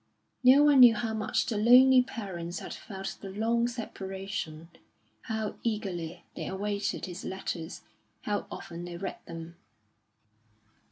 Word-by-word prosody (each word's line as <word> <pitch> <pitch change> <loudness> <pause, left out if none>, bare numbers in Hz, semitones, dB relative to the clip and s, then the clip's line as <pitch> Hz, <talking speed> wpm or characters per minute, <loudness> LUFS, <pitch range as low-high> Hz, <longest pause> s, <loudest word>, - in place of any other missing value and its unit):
No 265 +3 +8
one 290 -2 +6
knew 240 -3 +9
how 225 +1 -2
much 220 0 0
the 215 -3 -1
lonely 255 +3 +7
parents 190 -8 -5
had - - -6
felt 195 -2 -7
the 195 - -7
long 230 +4 +1
separation, 190 -8 -5 0.6
how 220 -2 -3
eagerly 180 -7 -3
they - - -4
awaited 200 +1 -2
his 180 0 -7
letters, 175 -3 -5 0.4
how 205 -1 -2
often 175 -2 -7
they 175 0 -6
read 190 +1 -5
them. 165 0 -8
200 Hz, 130 wpm, -29 LUFS, 175-230 Hz, 0.6 s, knew